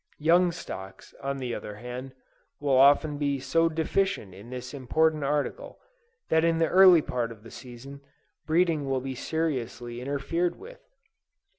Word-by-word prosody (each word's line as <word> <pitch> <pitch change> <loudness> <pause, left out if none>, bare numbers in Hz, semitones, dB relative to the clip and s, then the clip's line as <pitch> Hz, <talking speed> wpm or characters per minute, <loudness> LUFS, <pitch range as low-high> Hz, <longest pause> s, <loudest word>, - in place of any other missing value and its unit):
Young 170 +3 +4
stocks, 95 - -9
on 140 0 -3
the 125 -3 -4
other 105 -2 -6
hand, 125 +4 -8 0.4
will 140 -2 +1
often 145 +2 +5
be 140 -2 0
so 165 +5 +2
deficient 165 - -1
in 100 +5 -12
this 125 +1 -7
important 150 +3 +1
article, 150 - -2 0.5
that 160 0 +3
in 165 -1 +2
the 165 -1 +2
early 185 -4 +7
part 120 -2 -2
of 110 -2 -13
the 115 - -12
season, 135 +3 -11 0.5
breeding 160 -3 +1
will 135 -1 0
be 135 0 -4
seriously 125 -5 -3
interfered 145 +6 -1
with. - - -12
140 Hz, 150 wpm, -27 LUFS, 125-165 Hz, 0.5 s, early